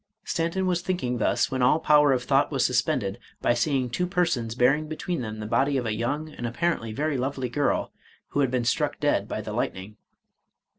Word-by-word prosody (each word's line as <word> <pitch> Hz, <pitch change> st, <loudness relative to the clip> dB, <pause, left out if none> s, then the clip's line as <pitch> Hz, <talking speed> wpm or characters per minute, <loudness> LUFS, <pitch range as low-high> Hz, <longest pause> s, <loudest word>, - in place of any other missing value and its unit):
Stanton 170 Hz, +3 st, -1 dB
was 180 Hz, -2 st, +1 dB
thinking 175 Hz, -10 st, -2 dB
thus, -, -, +1 dB
when 130 Hz, -1 st, -1 dB
all 125 Hz, +5 st, +4 dB
power 150 Hz, -2 st, +5 dB
of 125 Hz, -2 st, +1 dB
thought -, -, +2 dB
was -, -, +1 dB
suspended, -, -, 0 dB, 0.2 s
by -, -, +2 dB
seeing 130 Hz, +1 st, +1 dB
two 180 Hz, +9 st, -1 dB
persons 160 Hz, -11 st, 0 dB
bearing 135 Hz, +5 st, +3 dB
between 160 Hz, +1 st, -3 dB
them 110 Hz, -2 st, -5 dB
the 105 Hz, -, -5 dB
body 135 Hz, +5 st, +1 dB
of 125 Hz, -, -2 dB
a 110 Hz, -, -1 dB
young, 140 Hz, +8 st, -2 dB
and 120 Hz, -, -4 dB
apparently 120 Hz, -3 st, -1 dB
very 145 Hz, +5 st, -1 dB
lovely 130 Hz, -1 st, -2 dB
girl, 145 Hz, +4 st, 0 dB, 0.4 s
who -, -, -2 dB
had 135 Hz, -3 st, +3 dB
been 125 Hz, -1 st, -1 dB
struck 120 Hz, -, 0 dB
dead -, -, +1 dB
by -, -, -3 dB
the -, -, -6 dB
lightning. 100 Hz, +3 st, -3 dB
135 Hz, 200 wpm, -26 LUFS, 120-155 Hz, 0.4 s, power